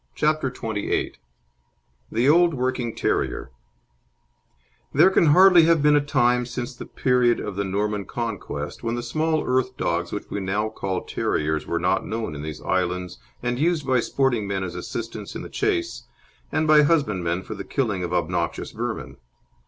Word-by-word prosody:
CHAPTER 155 -2 +1
XXVIII 110 -5 -2 1.0
THE 120 +4 +1
OLD 170 +1 +5
WORKING 125 -2 -2
TERRIER - - -1 1.4
There 190 - +6
can 170 - +4
hardly 180 +2 +7
have 165 -3 +3
been 150 0 +5
a 145 - +4
time 125 -4 +2
since 125 0 -5
the - - -9
period 125 -2 +2
of 105 -2 -5
the 100 - -1
Norman 100 +1 -1
Conquest 115 -5 -5
when 115 0 -2
the 120 - -4
small 155 +5 0
earth 130 0 0
dogs 85 0 -1
which 105 - -5
we 100 - -2
now 100 +3 -1
call 100 -3 -3
terriers 75 0 -1
were 85 - -1
not 90 +3 +1
known 110 -8 -4
in 75 - -6
these 75 0 -7
islands 90 -1 -1 0.2
and 120 0 -1
used 160 -1 +1
by 130 -2 +3
sporting 120 -4 0
men 95 -1 -2
as 90 - -5
assistants 110 -3 -6
in - - -5
the - - -8
chase, 365 -4 -2 0.4
and 155 - +1
by 155 -1 +7
husbandmen 100 - +1
for - - -6
the - - -6
killing 105 -9 -1
of 90 - -3
obnoxious 85 -1 -1
vermin. - - -5
120 Hz, 170 wpm, -24 LUFS, 95-145 Hz, 1.4 s, hardly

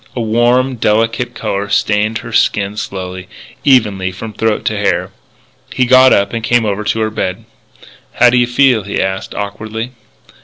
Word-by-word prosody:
A - - -3
warm, 120 +3 +1
delicate 115 +3 0
colour 100 -2 -3
stained 105 +2 +1
her 115 - -8
skin 100 -2 +1
slowly, 95 -3 -6 0.4
evenly, 105 -9 +2
from 105 +4 -8
throat 110 0 -1
to - - 0
hair. - - -1 0.6
He 125 - +2
got 130 +1 +6
up 100 +2 +2
and 115 -1 -3
came 120 0 +2
over 105 0 -2
to 110 +1 0
the 110 - -2
bed. 95 -4 -4 0.7
"How 125 - +4
do 125 - +2
you 120 - +2
feel?" 125 -2 +3
he 100 0 -4
asked, 95 0 -3
awkwardly. 110 +3 -5
110 Hz, 165 wpm, -15 LUFS, 100-120 Hz, 0.7 s, got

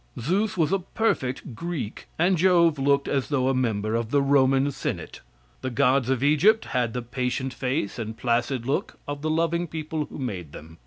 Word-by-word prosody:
Zeus 190 - 0
was 160 -1 +2
a 195 - +2
perfect 140 - -2
Greek 165 -5 -5
and 180 +3 +3
Jove 170 -3 +4
looked 140 +1 +2
as 135 -2 -1
though 135 -3 +1
a - - +2
member 110 -4 0
of 115 -1 -1
the 145 - +3
Roman 135 0 +3
senate. - - -5 0.4
The 130 - -2
gods 125 +1 +2
of 135 -1 +1
Egypt 180 +10 +4
had 120 -3 -1
the 125 - -3
patient 125 +2 -2
face 125 -4 -2
and 110 0 -5
placid 120 +1 0
look 135 - -2
of 145 0 -4
the 155 - -1
loving 165 +2 +1
people 155 -1 -3
who - - -10
made 95 - -5
them. 80 +2 -12
135 Hz, 190 wpm, -25 LUFS, 125-160 Hz, 0.4 s, Jove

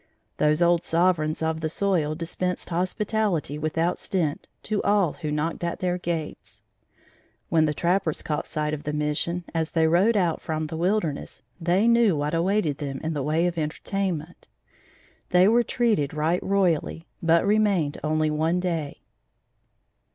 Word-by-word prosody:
Those 150 +3 +3
old 170 0 +3
sovereigns 165 -2 +1
of 160 0 -1
the 160 - -1
soil 165 -4 0
dispensed 180 +2 -3
hospitality 185 - -1
without 160 +3 -1
stint 165 -7 -2 0.2
to 215 -1 -1
all 200 -5 +2
who 155 -3 -5
knocked 150 +3 -2
at 170 0 -2
their 180 -1 -1
gates. 165 -3 -5 0.9
When 160 -1 +3
the 150 - 0
trappers 175 -1 0
caught 150 - -2
sight 150 -1 -2
of 150 - -3
the 150 - -4
Mission, 150 +4 -1
as 165 -1 -1
they 160 -1 +3
rode 190 +8 +3
out 175 -4 +1
from 155 -1 -2
the 155 - -6
wilderness, 170 -3 -1 0.2
they 180 +6 +2
knew 235 -7 +4
what 145 +2 -2
awaited 170 -3 +1
them 140 -2 -4
in 160 +1 -1
the 145 - -2
way 155 +5 +1
of 175 -1 -1
entertainment. 165 +1 -3 0.8
They 180 +1 +5
were 235 +3 +5
treated 220 - 0
right 160 +4 +1
royally, 175 -4 0 0.2
but 165 +1 +3
remained 200 -8 +2
only 155 0 +1
one 160 +3 +1
day. 165 -5 -3
165 Hz, 155 wpm, -25 LUFS, 155-185 Hz, 0.9 s, They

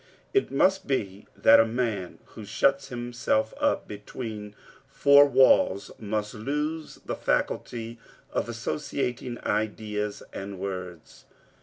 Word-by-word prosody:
It 400 - +2
must 190 +7 +2
be 100 -7 -2
that - - +7
a - - +8
man 110 -6 -2
who 110 - -10
shuts 135 +7 +1
himself 120 -3 -1
up - - +1
between 105 0 -7 0.3
four 140 0 +6
walls 130 -7 +4
must 105 0 -3
lose 150 +7 -3
the - - -3
faculty 115 -1 -2 0.3
of 120 - -1
associating 125 0 -3
ideas 105 -1 -2
and 100 0 -6
words. 90 -3 -7
115 Hz, 115 wpm, -27 LUFS, 105-135 Hz, 0.3 s, a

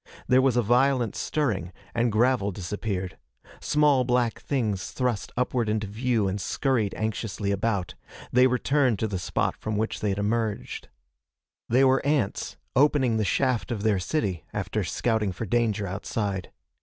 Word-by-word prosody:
There 130 +1 +5
was 130 -2 +2
a 120 - +3
violent 125 0 +2
stirring, 105 - -1 0.2
and 120 0 +1
gravel 115 -1 +2
disappeared. 95 0 -4 0.4
Small 150 -3 +3
black 125 -2 +1
things 110 -9 -1
thrust 125 -5 -2
upward 125 -2 0
into 105 0 0
view 110 +1 0
and 95 +1 -2
scurried 120 -6 0
anxiously 110 -2 -2
about. 100 -2 -1 0.4
They 125 +1 +6
returned 130 -1 +2
to 110 - -1
the 100 -3 -3
spot 90 - -1
from 110 -1 -3
which 110 +1 -1
they 105 - 0
had 95 - -1
emerged. 105 - -2 0.8
They 125 +3 +4
were 135 +1 +4
ants, 140 -8 -1 0.2
opening 130 -4 +3
the 110 - +1
shaft 130 +1 +1
of 110 -4 -3
their 105 -4 +2
city 95 - -1
after - - -2
scouting 110 -4 0
for 115 - -5
danger 110 -1 +1
outside. 100 0 -3
115 Hz, 155 wpm, -26 LUFS, 100-125 Hz, 0.8 s, They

